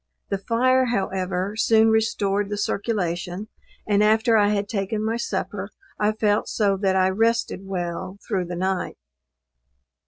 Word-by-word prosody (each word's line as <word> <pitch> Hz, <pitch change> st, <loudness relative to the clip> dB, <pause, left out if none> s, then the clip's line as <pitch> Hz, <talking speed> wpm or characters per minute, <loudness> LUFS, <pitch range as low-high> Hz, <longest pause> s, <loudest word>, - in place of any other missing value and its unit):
The 200 Hz, -, -1 dB
fire, 255 Hz, +5 st, +2 dB
however, 190 Hz, -3 st, -2 dB
soon 225 Hz, 0 st, +4 dB
restored 205 Hz, -3 st, +1 dB
the 205 Hz, -, -3 dB
circulation, 200 Hz, -2 st, -2 dB, 0.4 s
and 205 Hz, -1 st, +2 dB
after 220 Hz, +2 st, +4 dB
I 205 Hz, -2 st, +5 dB
had 205 Hz, -1 st, 0 dB
taken 210 Hz, 0 st, -2 dB
my 225 Hz, +1 st, 0 dB
supper 205 Hz, -4 st, -3 dB, 0.3 s
I 210 Hz, 0 st, +3 dB
felt 215 Hz, -1 st, 0 dB
so 200 Hz, -3 st, +1 dB
that 190 Hz, -1 st, +1 dB
I 185 Hz, 0 st, +4 dB
rested 225 Hz, -2 st, 0 dB
well 185 Hz, 0 st, -4 dB
through 190 Hz, -5 st, -1 dB
the 175 Hz, 0 st, -5 dB
night. 185 Hz, +1 st, -2 dB
205 Hz, 145 wpm, -23 LUFS, 190-220 Hz, 0.4 s, I